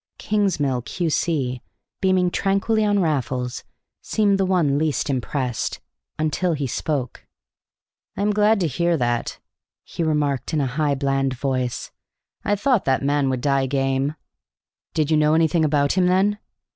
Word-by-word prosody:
Kingsmill, 170 Hz, -12 st, 0 dB
Q.C., 150 Hz, -5 st, -1 dB, 0.4 s
beaming 185 Hz, -2 st, +2 dB
tranquilly 200 Hz, +4 st, +1 dB
on 205 Hz, -2 st, +2 dB
Raffles, 130 Hz, -5 st, -2 dB, 0.4 s
seemed 200 Hz, -2 st, +1 dB
the 190 Hz, -, +2 dB
one 160 Hz, -7 st, +2 dB
least 155 Hz, -1 st, 0 dB
impressed, 130 Hz, -1 st, -2 dB, 0.4 s
until 155 Hz, +3 st, 0 dB
he 145 Hz, -2 st, -2 dB
spoke. 135 Hz, 0 st, -3 dB, 0.9 s
"I 200 Hz, -, -1 dB
am 210 Hz, -, +2 dB
glad 210 Hz, +1 st, +3 dB
to 170 Hz, -, +2 dB
hear 170 Hz, +3 st, +1 dB
that," 120 Hz, -3 st, -1 dB, 0.5 s
he -, -, -6 dB
remarked 150 Hz, -2 st, 0 dB
in -, -, +2 dB
a 140 Hz, -, +1 dB
high 145 Hz, +2 st, 0 dB
bland 135 Hz, -1 st, 0 dB
voice. 130 Hz, -1 st, -2 dB, 0.5 s
"I 205 Hz, -, +1 dB
thought 245 Hz, +1 st, +1 dB
that 135 Hz, 0 st, +1 dB
man 140 Hz, -1 st, +1 dB
would 130 Hz, -2 st, -1 dB
die 135 Hz, -1 st, +1 dB
game." 135 Hz, +2 st, 0 dB, 0.8 s
"Did 155 Hz, -1 st, +1 dB
you 155 Hz, -, +4 dB
know 150 Hz, +1 st, +3 dB
anything 165 Hz, 0 st, +3 dB
about 145 Hz, -2 st, +2 dB
him, 185 Hz, -1 st, +2 dB
then?" 195 Hz, +3 st, +2 dB
150 Hz, 145 wpm, -22 LUFS, 135-185 Hz, 0.9 s, you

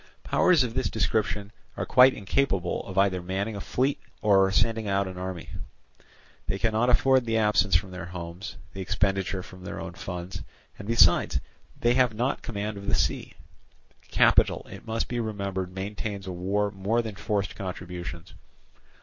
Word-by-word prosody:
Powers 170 Hz, -7 st, +4 dB
of 120 Hz, -2 st, -3 dB
this 130 Hz, +1 st, 0 dB
description 105 Hz, -1 st, 0 dB, 0.3 s
are -, -, -2 dB
quite 130 Hz, +1 st, +6 dB
incapable 95 Hz, -4 st, 0 dB
of 95 Hz, -1 st, -7 dB
often 95 Hz, -2 st, +3 dB
manning 100 Hz, +3 st, -2 dB
a 100 Hz, -, -5 dB
fleet 135 Hz, +7 st, 0 dB, 0.2 s
or 100 Hz, -2 st, +5 dB
often 95 Hz, -, +3 dB
sending 110 Hz, -2 st, 0 dB
out 100 Hz, 0 st, +1 dB
an 90 Hz, -1 st, -7 dB
army: 90 Hz, -2 st, -5 dB, 1.0 s
they 95 Hz, -, -1 dB
cannot 110 Hz, +3 st, +1 dB
afford 130 Hz, +1 st, +4 dB
the 115 Hz, -1 st, 0 dB
absence 105 Hz, -3 st, +3 dB
from 95 Hz, +3 st, +1 dB
their 90 Hz, -1 st, -6 dB
homes, 90 Hz, +2 st, -7 dB, 0.2 s
the 95 Hz, -, -6 dB
expenditure 95 Hz, 0 st, 0 dB
from 95 Hz, 0 st, -12 dB
their -, -, -6 dB
own -, -, -6 dB
funds; 90 Hz, +1 st, -6 dB, 0.4 s
and 100 Hz, -, -8 dB
besides, 100 Hz, -7 st, +4 dB, 0.4 s
they 120 Hz, +1 st, +3 dB
have 125 Hz, -3 st, +3 dB
not 125 Hz, +5 st, 0 dB
command 105 Hz, -2 st, -4 dB
of 100 Hz, 0 st, -8 dB
the -, -, +2 dB
sea. -, -, -1 dB, 0.7 s
Capital, -, -, +4 dB
it -, -, -11 dB
must 115 Hz, 0 st, -1 dB
be 120 Hz, -, -2 dB
remembered, 100 Hz, -4 st, -3 dB
maintains 100 Hz, +1 st, -5 dB
a 95 Hz, -, -4 dB
war 100 Hz, +3 st, 0 dB
more 105 Hz, +4 st, 0 dB
than 110 Hz, -2 st, -5 dB
forced 100 Hz, 0 st, -2 dB
contributions. 90 Hz, -2 st, -6 dB
100 Hz, 165 wpm, -27 LUFS, 95-110 Hz, 1.0 s, quite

